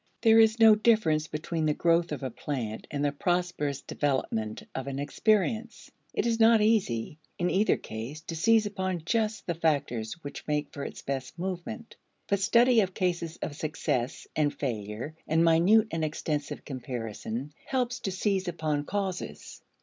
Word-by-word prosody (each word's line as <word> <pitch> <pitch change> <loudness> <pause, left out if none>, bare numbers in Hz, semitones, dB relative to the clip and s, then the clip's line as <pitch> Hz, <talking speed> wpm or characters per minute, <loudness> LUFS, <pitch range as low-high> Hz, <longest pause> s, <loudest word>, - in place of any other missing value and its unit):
There 225 -1 +7
is 220 +1 +5
no 225 -1 +9
difference 210 -9 +3
between 155 +1 -2
the 150 - +1
growth 170 0 +2
of 145 -2 -4
a 130 - -3
plant 115 -4 -4
and 145 0 -1
the 145 - +2
prosperous 175 -2 -1
development 115 -6 -2
of 130 - -4
an 135 -1 -3
experience. 220 +9 0 0.2
It - - -1
is 230 -1 +1
not 225 0 +6
easy, 185 - +1 0.2
in 175 0 0
either 205 +3 +3
case, 115 +8 -7
to 165 0 -6
seize 220 +6 +4
upon 190 -4 -2
just 220 +3 0
the 175 - -1
factors 140 -9 0
which 145 - -8
make 150 -1 -1
for 140 - -5
its - - -7
best 135 +2 -4
movement. 190 +6 -5 0.3
But 200 - +1
study 235 +4 +5
of 190 -2 -2
cases 170 -2 -1
of 145 - -4
success 145 -5 -2
and 150 -2 +2
failure 115 +1 -4
and 160 +2 +3
minute 190 +7 +5
and 165 -1 -1
extensive 150 -1 -3
comparison, 125 0 -5
helps 250 -2 -1
to 195 - -3
seize 190 0 0
upon 155 -4 -1
causes. 185 - -4
165 Hz, 165 wpm, -28 LUFS, 140-205 Hz, 0.3 s, no